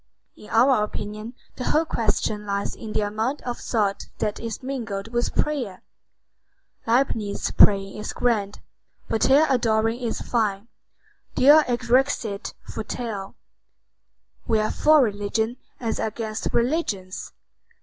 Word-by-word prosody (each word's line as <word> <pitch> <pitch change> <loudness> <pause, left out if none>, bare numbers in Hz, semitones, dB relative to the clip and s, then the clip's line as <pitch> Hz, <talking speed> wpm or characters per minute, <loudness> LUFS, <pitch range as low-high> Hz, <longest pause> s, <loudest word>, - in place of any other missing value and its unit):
In 210 - -14
our 240 -1 +4
opinion 215 +2 -6 0.2
the 250 - -4
whole 315 +2 +2
question 215 -5 -1
lies 200 0 -2
in 220 -2 -8
the - - +1
amount 220 +7 -2
of 245 -1 -4
thought 205 -4 -1
that 210 -1 -2
is 230 +1 -5
mingled 225 -6 -4
with 240 +1 -1
prayer. 250 -11 -1 1.0
Leibnitz 225 -4 +1
praying 195 -1 +5
is 210 - -4
grand, 215 -4 -1 0.5
Voltaire 270 +7 +4
adoring 225 -3 +1
is 235 -3 -2
fine. 215 -2 -1 0.7
Deo 290 +4 +8
erexit 240 -3 0
Voltaire. 215 -3 -5 1.1
We 225 - +3
are 215 - 0
for 305 -2 +5
religion 220 +2 -1 0.2
as 230 -3 -2
against 220 0 -3
religions. 235 - -1
225 Hz, 120 wpm, -24 LUFS, 210-245 Hz, 1.1 s, Deo